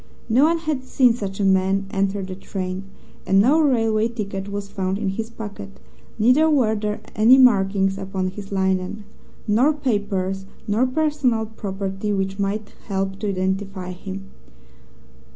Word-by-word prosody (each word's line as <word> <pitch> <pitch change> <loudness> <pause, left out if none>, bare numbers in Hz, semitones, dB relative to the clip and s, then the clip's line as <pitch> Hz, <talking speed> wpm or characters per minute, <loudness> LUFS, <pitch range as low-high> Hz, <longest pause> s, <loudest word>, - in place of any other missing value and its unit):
No 250 +6 +4
one 335 +1 +3
had 310 -5 -2
seen 255 -2 +3
such 200 -4 -5
a - - +1
man 190 +1 +2
enter 195 0 0
the 185 0 -6
train, 185 0 -5 0.4
and 195 +1 +4
no 280 +10 +5
railway 225 -6 +2
ticket 200 -4 -5
was 200 0 -4
found 190 -1 -2
in 205 -2 -1
his 220 +3 -4
pocket, 210 -3 -9 0.4
neither 255 +9 +4
were 255 -8 +3
there 210 -1 -3
any 230 +5 +7
markings 195 -5 +4
upon 190 -1 -2
his 195 0 -9
linen, 190 +1 -1 0.4
nor 245 +9 +4
papers 200 -8 -2 0.2
nor 220 +5 +2
personal 270 -5 +1
property 195 -1 -4
which 195 0 -2
might 205 +1 -2
help 195 -1 -2
to 210 - -2
identify 190 0 -2
him. 195 +1 -8
200 Hz, 150 wpm, -22 LUFS, 195-225 Hz, 0.4 s, any